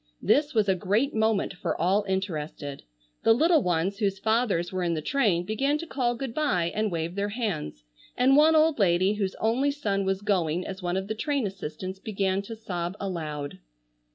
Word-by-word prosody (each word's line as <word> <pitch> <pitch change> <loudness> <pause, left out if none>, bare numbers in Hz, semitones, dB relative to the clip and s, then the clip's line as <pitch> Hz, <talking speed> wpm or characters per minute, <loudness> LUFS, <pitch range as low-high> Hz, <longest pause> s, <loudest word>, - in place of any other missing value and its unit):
This 290 -2 +2
was 215 -2 +3
a 190 - +4
great 205 +10 0
moment 220 -3 +1
for 180 - -3
all 190 +5 +2
interested. 155 -7 -3 0.4
The 225 - +5
little 320 +4 +4
ones 180 +1 0
whose 200 -3 0
fathers 220 -5 +1
were 185 -1 -2
in 170 -1 0
the - - -1
train 205 - +2
began 270 +8 0
to 335 - -6
call 250 -6 -1
good 240 -1 -5
bye 180 - +1
and 215 -1 0
wave 165 0 -2
their 200 +1 -1
hands, 195 - -3 0.3
and 260 +2 +5
one 310 +2 +6
old 315 -3 +4
lady 185 +1 +3
whose 200 -3 -2
only 240 +6 +1
son 205 -9 -1
was 195 +1 -1
going 180 -4 0
as 190 0 -6
one 175 +1 -1
of 190 0 -3
the 220 - -2
train 275 +3 -1
assistants 190 0 -6
began 195 -2 -1
to 225 +3 -8
sob 180 -4 -4
aloud. 155 -7 -4
200 Hz, 190 wpm, -27 LUFS, 180-230 Hz, 0.4 s, one